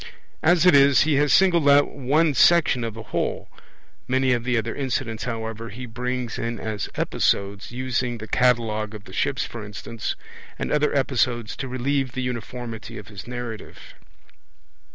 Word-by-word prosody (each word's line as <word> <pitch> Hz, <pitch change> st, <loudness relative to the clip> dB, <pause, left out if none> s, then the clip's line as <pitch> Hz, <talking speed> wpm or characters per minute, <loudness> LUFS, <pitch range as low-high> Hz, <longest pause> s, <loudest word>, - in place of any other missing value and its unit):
As 175 Hz, +1 st, +4 dB
it 180 Hz, -, +7 dB
is, 140 Hz, -1 st, +6 dB
he 150 Hz, -2 st, +3 dB
has 145 Hz, 0 st, +3 dB
singled 170 Hz, -6 st, +5 dB
out 145 Hz, 0 st, +6 dB
one 145 Hz, +4 st, +2 dB
section 150 Hz, -3 st, +4 dB
of 115 Hz, -2 st, -4 dB
the 110 Hz, -, -8 dB
whole; -, -, -2 dB, 0.6 s
many 130 Hz, 0 st, +2 dB
of 120 Hz, -1 st, -1 dB
the 125 Hz, 0 st, +1 dB
other 115 Hz, +1 st, -2 dB
incidents, 120 Hz, -5 st, -3 dB
however, 115 Hz, -1 st, -4 dB
he 125 Hz, +4 st, -7 dB
brings 125 Hz, 0 st, -4 dB
in 115 Hz, 0 st, -3 dB
as 110 Hz, -2 st, -4 dB
episodes, 100 Hz, +1 st, 0 dB
using 125 Hz, -1 st, -2 dB
the 110 Hz, 0 st, -8 dB
Catalogue 110 Hz, -3 st, +1 dB
of 105 Hz, -, -9 dB
the 95 Hz, -, -13 dB
Ships, 140 Hz, +4 st, 0 dB
for 115 Hz, -2 st, -7 dB
instance, 105 Hz, +2 st, -5 dB, 0.4 s
and -, -, -3 dB
other 150 Hz, 0 st, +2 dB
episodes 125 Hz, -4 st, 0 dB
to 135 Hz, -, -4 dB
relieve 130 Hz, +1 st, -1 dB
the 130 Hz, -1 st, -3 dB
uniformity 120 Hz, -2 st, -6 dB
of 105 Hz, -, -10 dB
his 100 Hz, +1 st, -9 dB
narrative. 120 Hz, -3 st, -6 dB
125 Hz, 165 wpm, -24 LUFS, 115-135 Hz, 0.6 s, it